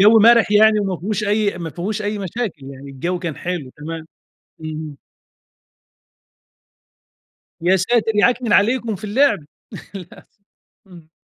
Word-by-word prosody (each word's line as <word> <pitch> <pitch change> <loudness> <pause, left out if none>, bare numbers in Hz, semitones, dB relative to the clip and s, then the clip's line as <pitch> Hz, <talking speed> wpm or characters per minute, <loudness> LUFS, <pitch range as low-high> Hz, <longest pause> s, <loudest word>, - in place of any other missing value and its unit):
جَو 215 +3 +7
مَرِح 230 0 +5
يعني 215 0 +5
وما 195 -3 -2
فيهوش 210 +4 -3
أي 205 -2 0
ما 165 -2 -5
فيهوش 205 +7 -4
أي 210 0 -2
مشاكل. 195 - -5
يعني 140 +1 -10
الجَو 170 +7 -3
كان 170 -4 -5
حلو، 170 -7 -4
تمام. 160 +2 -7 0.6
اهم. 155 -2 -6 2.7
يا 180 +3 +3
ساتِر! 225 +4 +1
يِعكنِن 240 +2 +2
عليكم 230 +1 +2
في 195 - -13
اللعب. 265 +8 +2 0.6
للأسف 185 +2 -12 0.5
إمم. 170 -4 -15
200 Hz, 130 wpm, -20 LUFS, 165-215 Hz, 2.7 s, جَو